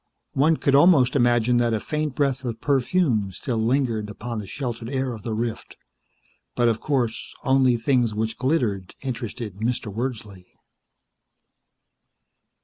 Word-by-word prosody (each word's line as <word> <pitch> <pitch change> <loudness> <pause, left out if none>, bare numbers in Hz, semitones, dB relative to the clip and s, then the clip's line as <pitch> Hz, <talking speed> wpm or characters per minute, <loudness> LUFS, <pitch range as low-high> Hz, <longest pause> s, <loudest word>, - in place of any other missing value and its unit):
One 155 +4 +3
could 140 - +1
almost 140 -4 +5
imagine 120 -2 +3
that 120 -1 +2
a - - -1
faint 150 +2 -3
breath 135 -2 0
of 115 -3 -4
perfume 130 - +1
still 115 +5 -3
lingered 115 -3 0
upon 110 +2 -5
the 105 - -7
sheltered 120 0 -5
air 130 -2 -1
of 110 - -8
the 110 +1 -3
rift, 115 0 -4 0.8
but, 120 - +3
of 115 -1 +1
course, 125 -6 -1
only 130 -3 +3
things 120 -1 +2
which 110 +1 -2
glittered 120 - 0
interested 115 -5 -5
Mr. 110 -1 -2
Wordsley. 110 -6 -5
120 Hz, 140 wpm, -24 LUFS, 110-135 Hz, 0.8 s, almost